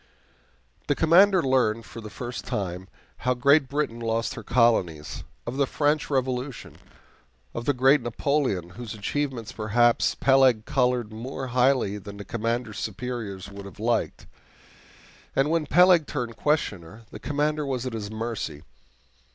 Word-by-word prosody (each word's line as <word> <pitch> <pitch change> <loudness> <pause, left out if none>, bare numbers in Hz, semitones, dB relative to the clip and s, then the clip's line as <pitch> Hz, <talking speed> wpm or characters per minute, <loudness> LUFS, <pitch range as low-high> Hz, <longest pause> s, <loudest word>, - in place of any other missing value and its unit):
The 145 - +2
Commander 180 +4 +5
learned, 120 -4 +1
for 115 +4 -9
the 110 - -8
first 120 +3 -6
time, 95 -2 -4 0.3
how 125 +1 0
Great 140 +2 +4
Britain 140 -5 -2
lost 115 0 -1
her 115 - -7
colonies; 105 -10 +1 0.2
of 120 +3 -4
the 140 -1 +2
French 150 +2 0
Revolution; 130 -1 -2 0.8
of 115 - -5
the 145 - +2
great 135 +2 +4
Napoleon, 120 - -1
whose 115 +1 -7
achievements, 120 +2 -3
perhaps, 120 +1 +2
Peleg 130 -5 +4
colored 125 -4 0
more 130 +3 -5
highly 125 -5 +2
than 100 +1 -10
the 100 - -8
Commander's 115 0 -2
superiors 110 -3 -5
would 100 0 -9
have 100 - -13
liked. 115 +2 -1 1.1
And 135 +3 +2
when 165 -2 +1
Peleg 175 -1 +5
turned 115 -2 -4
questioner, 110 - -2
the - - -9
Commander 150 +1 -1
was 130 -3 -3
at 130 - -4
his 105 -2 -4
mercy. 110 -8 -4
120 Hz, 145 wpm, -26 LUFS, 110-140 Hz, 1.1 s, Commander